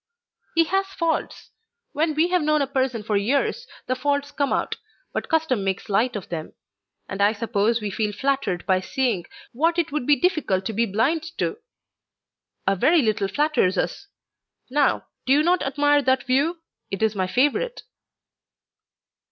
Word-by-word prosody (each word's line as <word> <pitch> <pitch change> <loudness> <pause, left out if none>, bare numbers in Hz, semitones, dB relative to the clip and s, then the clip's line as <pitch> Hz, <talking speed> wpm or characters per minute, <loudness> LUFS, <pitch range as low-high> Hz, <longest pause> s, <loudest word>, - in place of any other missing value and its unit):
"He 330 - +5
has 385 +4 0
faults. 335 -4 -3 0.4
When 310 +1 0
we 325 +3 +3
have 360 -1 +2
known 305 -1 +2
a - - 0
person 260 -4 -1
for 210 0 -1
years 275 - 0 0.2
the 255 - 0
faults 285 +2 -1
come 280 -2 -1
out, - - -1 0.4
but - - -3
custom 315 - +1
makes 195 +1 -3
light 225 +5 +1
of 200 - -6
them; 160 -2 -5 0.5
and 195 +1 -4
I 205 +2 +4
suppose 225 +1 0
we 210 -1 -3
feel 210 +1 -1
flattered 265 -5 -1
by 190 -1 +3
seeing 220 -2 -1 0.2
what 330 +7 +1
it 330 -3 0
would 290 -4 -2
be 295 - +6
difficult 285 - 0
to 220 - -2
be 230 +2 +1
blind 270 - +1
to! 435 - -2 1.1
A 195 - +3
very 300 - +4
little 215 -3 +1
flatters 250 -4 +1
us! 400 - -2 0.6
Now, 290 0 +2 0.2
do 265 - +5
you 295 +2 +4
not 355 +2 +3
admire 290 +1 +2
that 260 0 +1
view? 290 +7 +1 0.3
It 195 +2 -3
is 220 -1 +2
my 185 -2 0
favourite." 290 - 0
265 Hz, 170 wpm, -23 LUFS, 210-310 Hz, 1.1 s, be